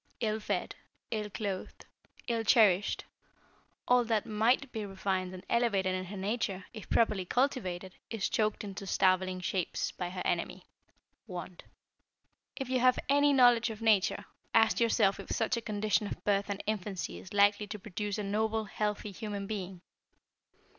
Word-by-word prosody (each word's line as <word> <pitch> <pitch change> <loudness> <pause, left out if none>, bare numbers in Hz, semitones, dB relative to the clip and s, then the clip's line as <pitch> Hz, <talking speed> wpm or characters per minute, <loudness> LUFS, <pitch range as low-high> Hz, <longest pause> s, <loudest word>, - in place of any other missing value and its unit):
Ill 220 -1 0
fed, 215 - -2 0.4
ill 215 -2 -2
clothed, 200 -3 -5 0.4
ill 230 -2 0
cherished, 210 -4 +4 0.8
all 250 0 +5
that 225 -2 0
might 235 +5 +2
be 220 -2 -4
refined 190 -2 -2
and 185 -1 -10
elevated 200 -6 +2
in 185 0 -2
her 200 +2 -7
nature, 195 -2 -2
if 215 -3 -9
properly 215 -4 +2
cultivated, 190 -6 -1 0.2
is 225 -4 -1
choked 215 -1 0
into 195 -1 -7
starveling 185 0 +2
shapes 180 -1 -2
by 180 -1 -4
her 180 0 -5
enemy - - -2 0.6
Want. 180 -2 -8 0.9
"If 270 - -4
you 255 0 +1
have 255 0 +4
any 285 +1 +5
knowledge 245 -3 +5
of 220 -1 -7
nature, 205 -2 +3 0.3
ask 225 -1 +5
yourself 220 -4 +3
if - - -9
such 230 +1 +1
a 235 - -3
condition 215 -1 0
of - - -7
birth 200 0 +1
and 200 0 -3
infancy 205 -3 -3
is 185 - -12
likely 205 0 +3
to 210 +1 -5
produce 205 +1 -4
a 210 - -2
noble, 220 +2 0
healthy 210 0 -2
human 205 0 -5
being? 190 -3 -5
210 Hz, 155 wpm, -31 LUFS, 190-225 Hz, 0.9 s, all